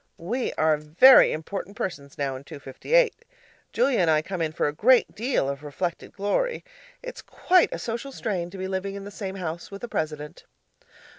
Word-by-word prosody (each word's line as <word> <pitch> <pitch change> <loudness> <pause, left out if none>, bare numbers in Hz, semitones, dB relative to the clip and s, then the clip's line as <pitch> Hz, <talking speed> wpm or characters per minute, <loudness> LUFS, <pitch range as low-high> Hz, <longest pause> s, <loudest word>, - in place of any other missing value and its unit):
We're 170 -6 0
very 160 - +7
important 195 +5 -6
persons 140 -7 -5
now 140 -2 -2
in 130 - -9
'258.' 310 - 0 0.5
Julia 250 +2 +2
and 170 -3 +3
I 155 -1 +3
come 185 0 -5
in 160 -1 0
for 155 - 0
a 145 - -2
great 240 +10 +4
deal 235 - 0
of 140 0 -4
reflected 160 +4 -4
glory. 205 - -1 0.4
It's - - -7
quite 365 -1 +2
a - - -3
social 235 +4 -5
strain 185 -9 -3
to 195 - -10
be 190 0 -4
living 190 +1 -3
in 200 - -7
the 205 - -9
same 195 -2 -6
house 170 -3 -5
with 200 +2 -10
a - - -3
president. 150 -6 -4
190 Hz, 180 wpm, -25 LUFS, 155-230 Hz, 0.5 s, very